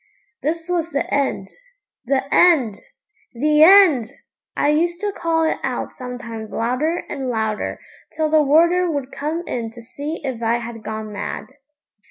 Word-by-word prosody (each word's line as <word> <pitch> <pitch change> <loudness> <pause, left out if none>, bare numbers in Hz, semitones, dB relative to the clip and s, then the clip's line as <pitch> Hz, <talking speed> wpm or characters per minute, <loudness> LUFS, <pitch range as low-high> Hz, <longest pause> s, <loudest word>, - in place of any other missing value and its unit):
This 325 +4 -2
was 345 -2 -1
the 280 - -1
end 270 -9 0 0.6
the 265 +1 +1
end 270 - +4 0.5
the 300 +5 +3
end! 320 - +7 0.5
I 290 - +2
used 340 +3 +1
to 415 -1 -1
call 330 -4 0
it 320 - 0
out - - -3
sometimes 240 -4 -7
louder 255 +9 -1
and 265 -2 -4
louder, 220 -2 -2 0.4
till 315 -1 +2
the 310 0 +4
warder 340 +5 +4
would 280 -4 -3
come 310 +4 -3
in 230 -2 -3
to 230 +2 -13
see 290 +7 -6
if 260 -4 -4
I 230 +1 +1
had 230 -1 -8
gone 215 0 -5
mad. 200 - -5
280 Hz, 155 wpm, -21 LUFS, 235-325 Hz, 0.6 s, end